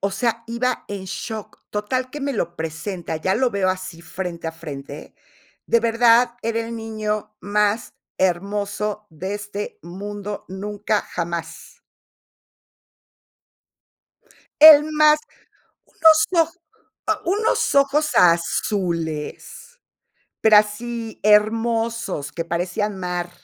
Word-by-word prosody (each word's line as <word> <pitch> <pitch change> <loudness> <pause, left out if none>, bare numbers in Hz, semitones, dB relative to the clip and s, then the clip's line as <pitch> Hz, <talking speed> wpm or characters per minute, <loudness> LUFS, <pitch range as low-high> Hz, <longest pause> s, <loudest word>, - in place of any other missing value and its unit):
o 200 - 0
sea, 230 +3 -1
iba 235 +1 -2
en 200 -2 -5
shock. 215 +3 -6
Total 255 +5 -2
que 295 - -7
me 280 0 -1
lo 175 -6 -3
presenta, 165 +2 -4
ya 185 +5 0
lo 250 +3 +2
veo 200 -3 0
así 185 -3 -4
frente 170 0 -6
a 160 - -3
frente. 145 -3 -9 0.5
De 235 - +3
verdad, 235 +1 +4
era 230 0 -1
el 230 0 -5
niño 215 -1 -4
más 210 +2 0 0.2
hermoso 200 +3 -1
de 185 +5 -5
este 205 0 -6
mundo, 205 +3 -6
nunca 205 +2 -2
jamás. 170 - -6 2.8
El 300 -1 +11
más 305 0 +5 0.7
¡unos 320 +2 +4
o!, 330 - -20 0.5
ah, - - 0
unos 410 +6 +1
ojos 285 +2 +3
azules, 170 - 0 0.6
pero 220 -1 +6
así, 225 +2 -3
hermosos, 225 -5 +1
que 165 - -3
parecían 180 +5 -2
mar. 180 -1 -3
210 Hz, 110 wpm, -22 LUFS, 180-235 Hz, 2.8 s, El